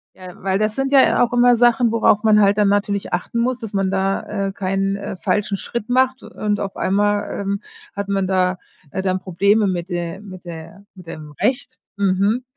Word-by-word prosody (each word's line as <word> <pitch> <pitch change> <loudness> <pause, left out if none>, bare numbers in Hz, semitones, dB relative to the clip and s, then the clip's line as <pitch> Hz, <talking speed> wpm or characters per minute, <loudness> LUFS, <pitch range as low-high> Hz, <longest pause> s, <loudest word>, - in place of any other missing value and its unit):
Ja, 185 -1 -11
weil 190 0 0
das 215 0 0
sind 270 0 -1
ja 270 -3 +5
auch 240 - 0
immer 245 0 +5
Sachen, 240 0 +3
worauf 220 -2 +3
man 215 -1 +5
halt 200 +1 +3
dann 210 - +3
natürlich 200 0 0
achten 180 +6 -2
muss, 250 +1 0
dass 225 - -6
man 195 -1 0
da, 195 +1 -1
äh, - - -3
keinen, 195 0 -1
äh, 200 -1 -6
falschen 200 +2 -1
Schritt 235 +1 -5
macht. 260 +1 +2
Und 205 -1 -3
auf 195 -1 -4
einmal, 205 +1 0
ähm, 200 +1 -2 0.3
hat 200 0 -4
man 195 -1 0
da, 185 -1 +1 0.3
äh, 190 - -2
dann 185 -1 0
Probleme 200 +4 +2
mit 175 -2 -2
de 175 +1 -4
mit 185 -3 -11
de 165 -2 -8 0.3
mit 180 -3 -14
dem 155 -2 -9
Recht. 255 +4 -1 0.2
Mhm. 200 +4 +1
200 Hz, 200 wpm, -20 LUFS, 190-220 Hz, 0.3 s, ja